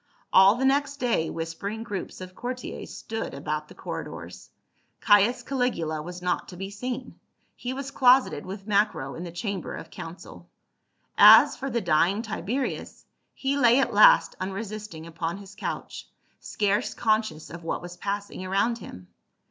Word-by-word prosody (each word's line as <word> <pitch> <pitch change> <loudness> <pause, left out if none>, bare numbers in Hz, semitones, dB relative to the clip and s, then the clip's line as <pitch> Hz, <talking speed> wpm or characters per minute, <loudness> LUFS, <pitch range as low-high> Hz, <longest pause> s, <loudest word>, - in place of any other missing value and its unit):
All 190 +2 +7
the 260 +2 -1
next 280 +1 +1
day 235 - 0
whispering 165 +7 -5
groups 200 -4 -6
of 185 0 -8
courtiers 250 +4 -6
stood 225 -9 -5
about 150 +2 -3
the - - -14
corridors. - - -7 0.5
Caius 225 +4 +4
Caligula 240 - -1
was 180 +3 -8
not 180 - -1
to 180 - -10
be 195 +2 -6
seen, 250 +4 -6 0.4
he 245 - -5
was 275 +1 -5
closeted 255 0 +4
with 195 +1 -8
Macro 205 -10 +1
in 170 - -7
the 175 - -6
chamber 185 +2 -4
of 165 - -9
council. 165 +2 -10 0.7
As - - +9
for 270 - -4
the 235 -2 -1
dying 175 +5 +2
Tiberius, 230 +4 -4 0.3
he 275 +1 -1
lay 250 -2 +5
at 270 - +1
last - - +6
unresisting 195 -3 -5
upon 170 +1 -4
his 200 0 -12
couch, - - -6 0.3
scarce 205 0 -1
conscious 215 -8 0
of 170 0 -9
what 165 - -3
was 175 0 -8
passing 200 0 -4
around 200 +5 0
him. 90 - -11
200 Hz, 155 wpm, -26 LUFS, 175-240 Hz, 0.7 s, As